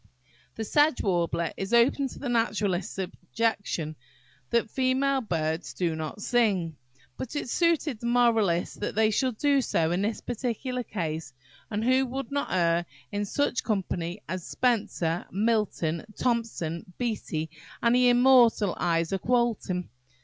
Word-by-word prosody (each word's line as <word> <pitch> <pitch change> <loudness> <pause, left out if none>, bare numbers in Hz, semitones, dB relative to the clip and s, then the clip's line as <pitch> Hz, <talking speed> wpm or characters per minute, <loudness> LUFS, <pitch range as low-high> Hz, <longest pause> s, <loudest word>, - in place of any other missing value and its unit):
"The 225 - -3
Sedge 295 +5 +3
Warbler" 170 -3 0
is 195 +5 0
open 260 +4 +4
to - - -10
the 280 - -5
naturalist's 210 -7 0
objection, 190 -3 -2 0.5
that 235 -2 +1
female 265 +1 +1
birds 160 -5 -2
do 170 -3 0
not 160 +6 -5
sing. 195 -10 +1 0.4
But 260 +3 -6
it 290 - -3
suited 325 -6 +1
the 235 - -4
moralist 225 -8 +2
that 205 - -3
they 220 0 +3
should 255 +1 0
do 285 0 +3
so 165 -9 +1
in 180 +2 0
this 215 +2 -1
particular 250 +1 -3
case; 160 - -4 0.4
and 210 0 -2
who 260 +2 +3
would 265 0 -5
not 285 0 -2
err 170 -1 +2 0.2
in 205 0 -1
such 260 +3 0
company 190 -3 -2
as 185 -2 -4
Spenser, 200 -9 0
Milton, 200 -6 0
Thomson, 220 -7 -2
Beattie, 185 -10 -3 0.3
and 235 0 +4
the 250 0 +5
immortal 245 -5 +5
Isaak 170 +2 0
Walton? 230 -7 0
215 Hz, 140 wpm, -27 LUFS, 175-245 Hz, 0.5 s, the